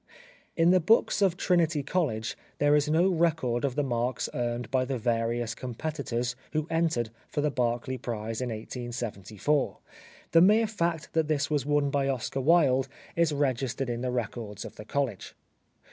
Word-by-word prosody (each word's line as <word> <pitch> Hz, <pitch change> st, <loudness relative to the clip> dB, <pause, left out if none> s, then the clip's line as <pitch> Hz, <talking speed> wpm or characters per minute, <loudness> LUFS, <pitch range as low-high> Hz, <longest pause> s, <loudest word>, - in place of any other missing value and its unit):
In 165 Hz, +1 st, +5 dB
the 185 Hz, -, +5 dB
books 210 Hz, +4 st, +3 dB
of 185 Hz, -3 st, +3 dB
Trinity 165 Hz, -6 st, +2 dB
College 135 Hz, -9 st, -1 dB, 0.2 s
there 145 Hz, 0 st, +4 dB
is 150 Hz, 0 st, +2 dB
no 165 Hz, +4 st, +4 dB
record 160 Hz, -8 st, +1 dB
of 135 Hz, -3 st, 0 dB
the 145 Hz, -, +1 dB
marks 120 Hz, -1 st, -1 dB
earned 120 Hz, 0 st, -2 dB
by 130 Hz, -1 st, +2 dB
the 130 Hz, 0 st, -2 dB
various 115 Hz, 0 st, 0 dB
competitors 125 Hz, -1 st, -3 dB, 0.2 s
who 155 Hz, -1 st, 0 dB
entered 160 Hz, -9 st, +1 dB, 0.2 s
for 145 Hz, -, -2 dB
the 150 Hz, 0 st, +1 dB
Berkeley 125 Hz, +1 st, -1 dB
Prize 115 Hz, -1 st, -4 dB
in 125 Hz, -, -2 dB
1874. 120 Hz, +2 st, -2 dB, 0.5 s
The 165 Hz, -, +6 dB
mere 210 Hz, +5 st, +6 dB
fact 170 Hz, -7 st, -2 dB
that 160 Hz, -2 st, +2 dB
this 155 Hz, -1 st, 0 dB
was 145 Hz, -2 st, 0 dB
won 145 Hz, -1 st, +2 dB
by 140 Hz, -1 st, +1 dB
Oscar 135 Hz, +1 st, -2 dB
Wilde 135 Hz, -4 st, +4 dB, 0.3 s
is 170 Hz, -2 st, +3 dB
registered 135 Hz, -3 st, -1 dB
in 120 Hz, 0 st, -3 dB
the 130 Hz, -, -1 dB
records 115 Hz, -3 st, -4 dB
of -, -, -9 dB
the 105 Hz, -, -10 dB
college. 130 Hz, -5 st, -2 dB
135 Hz, 165 wpm, -28 LUFS, 120-155 Hz, 0.5 s, The